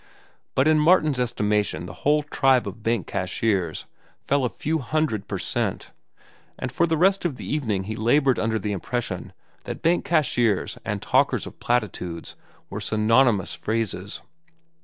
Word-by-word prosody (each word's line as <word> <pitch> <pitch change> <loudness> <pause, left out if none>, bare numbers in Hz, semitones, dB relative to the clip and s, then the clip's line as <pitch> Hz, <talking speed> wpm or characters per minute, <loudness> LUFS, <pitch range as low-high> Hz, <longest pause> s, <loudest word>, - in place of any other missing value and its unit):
But 130 +3 +3
in 155 -1 +5
Martin's 155 -4 +4
estimation 105 -8 0
the 90 - -8
whole 150 +1 +3
tribe 135 -4 +2
of 115 - -7
bank 115 -1 0
cashiers 95 -2 -1 0.4
fell 140 -1 +1
a 125 - +1
few 160 +6 -2
hundred 130 -7 -1
per - - -3
cent, - - -2 0.7
and 130 - -4
for 170 +6 +2
the 160 -1 +1
rest 190 +4 +3
of 170 -7 -1
the - - -8
evening 110 -10 -1
he 110 +3 -5
labored 130 +4 +3
under 110 0 0
the 105 0 -3
impression 100 -2 -3 0.3
that - - -6
bank 170 +2 +3
cashiers 125 - +1
and - - -3
talkers - - +2
of - - -11
platitudes 95 -8 -2 0.3
were - - -6
synonymous 110 -1 +3
phrases. 105 -3 -3
120 Hz, 155 wpm, -24 LUFS, 105-150 Hz, 0.7 s, in